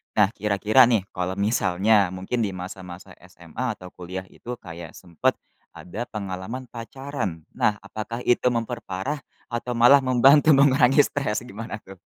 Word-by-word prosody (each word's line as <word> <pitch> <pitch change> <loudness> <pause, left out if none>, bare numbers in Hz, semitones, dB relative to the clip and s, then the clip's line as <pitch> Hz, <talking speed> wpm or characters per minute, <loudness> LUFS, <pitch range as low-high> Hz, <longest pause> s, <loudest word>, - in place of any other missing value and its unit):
Nah, 105 -2 +5
kira-kira 105 +4 +4
nih, 110 -6 +2
kalau 90 +1 -3
misalnya, 100 -1 +3
mungkin 95 +6 -3
di 100 - -1
masa-masa 90 0 -9 0.2
SMA, 90 +7 -5
atau 90 -1 -12
kuliah 90 +1 -7
itu 125 +1 -7
kayak 85 -2 -10
sempat, 85 -3 -1 0.4
ada 110 +7 -7
pengalaman 105 +5 -6
pacaran. 115 - -6
Nah, 105 -1 +1
apakah 110 +4 -6
itu 120 +1 +2
memperparah, 115 +3 -3 0.3
atau 120 +1 -3
malah 125 +4 +7
membantu 135 +4 +5
mengurangi 135 0 +5
stres? 120 -5 -2
Gimana, 110 -1 -7
tuh? 95 -2 -13
105 Hz, 140 wpm, -24 LUFS, 95-125 Hz, 0.4 s, malah